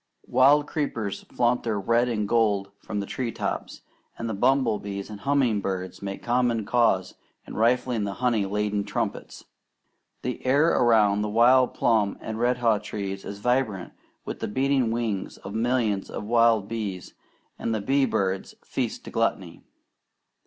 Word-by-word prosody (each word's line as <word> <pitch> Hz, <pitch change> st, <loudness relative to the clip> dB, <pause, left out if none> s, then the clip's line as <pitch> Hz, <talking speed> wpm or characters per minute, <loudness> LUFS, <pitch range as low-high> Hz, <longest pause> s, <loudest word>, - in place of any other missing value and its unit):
Wild 145 Hz, +3 st, +5 dB
creepers 120 Hz, -10 st, -3 dB
flaunt 120 Hz, 0 st, +1 dB
their 110 Hz, -3 st, -1 dB
red 115 Hz, +5 st, +2 dB
and 105 Hz, -3 st, -1 dB
gold 100 Hz, -3 st, +1 dB
from 105 Hz, -, -4 dB
the 100 Hz, -, -3 dB
treetops, 120 Hz, +2 st, -4 dB, 0.4 s
and 115 Hz, -, -4 dB
the 110 Hz, -, -2 dB
bumblebees 110 Hz, -4 st, 0 dB
and 105 Hz, -, -8 dB
humming 130 Hz, -5 st, +1 dB
birds 95 Hz, -2 st, -4 dB
make 100 Hz, -1 st, -6 dB
common 120 Hz, -2 st, +1 dB
cause 110 Hz, -5 st, +2 dB, 0.3 s
in -, -, -10 dB
rifling 120 Hz, 0 st, +1 dB
the 100 Hz, -1 st, -3 dB
honey 115 Hz, -5 st, +1 dB
laden 105 Hz, 0 st, -1 dB
trumpets. -, -, -4 dB, 0.8 s
The 125 Hz, +1 st, -4 dB
air 140 Hz, +5 st, +4 dB
around 110 Hz, -7 st, +4 dB
the 105 Hz, -, -1 dB
wild 125 Hz, +4 st, +4 dB
plum 110 Hz, -4 st, +2 dB
and 110 Hz, 0 st, -5 dB
redhaw 120 Hz, -3 st, +2 dB
trees 100 Hz, -2 st, -5 dB
is 100 Hz, -, -7 dB
vibrant 125 Hz, -6 st, 0 dB, 0.3 s
with -, -, -5 dB
the -, -, -3 dB
beating 130 Hz, +2 st, +1 dB
wings 115 Hz, -4 st, -2 dB
of 95 Hz, -, -9 dB
millions 110 Hz, -3 st, 0 dB
of -, -, -5 dB
wild 115 Hz, -2 st, +3 dB
bees, 105 Hz, -5 st, -5 dB, 0.5 s
and -, -, -2 dB
the 110 Hz, -, 0 dB
bee 135 Hz, +6 st, +2 dB
birds 95 Hz, -3 st, -1 dB
feast -, -, -3 dB
to -, -, -8 dB
gluttony. -, -, -1 dB
110 Hz, 150 wpm, -25 LUFS, 100-125 Hz, 0.8 s, Wild